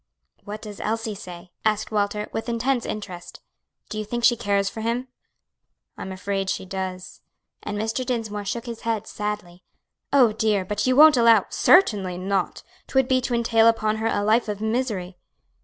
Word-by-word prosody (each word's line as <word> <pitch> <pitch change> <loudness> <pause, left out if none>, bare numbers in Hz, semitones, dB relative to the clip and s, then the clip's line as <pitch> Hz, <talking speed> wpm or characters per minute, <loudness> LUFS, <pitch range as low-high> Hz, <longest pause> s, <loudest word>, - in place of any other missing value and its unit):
"What 210 +1 -7
does 210 -2 -9
Elsie 225 0 -2
say?" 180 -2 -10
asked 215 0 0
Walter, 210 0 -1
with 225 +2 -3
intense 240 +1 0
interest; 180 -4 -7 0.5
"do 215 - -5
you - - -2
think 240 +3 -4
she 240 - +6
cares 200 -3 0
for 220 +3 -5
him?" 240 +3 -2 0.9
"I'm 190 - -7
afraid 195 0 -3
she 190 - -2
does," 185 -1 -6 0.4
and 210 0 -4
Mr. 225 +4 -1
Dinsmore 225 -5 -3
shook 235 +4 -3
his 235 -2 -7
head 225 -3 -2
sadly. 210 -4 -5 0.5
"Oh, 255 -5 +5
dear! 210 -3 0
but 210 +4 -1
you 255 - +3
won't 305 0 +8
allow 230 -4 +5
" - - -31 0.2
"Certainly 205 - +4
not; 190 0 -2 0.2
'twould 265 -1 +2
be 260 -1 +2
to 245 -1 -1
entail 230 -1 +3
upon 220 -1 +2
her 220 +1 -1
a 205 - 0
life 220 +3 +3
of 205 -1 -3
misery." 220 -5 -2
215 Hz, 175 wpm, -24 LUFS, 200-230 Hz, 0.9 s, won't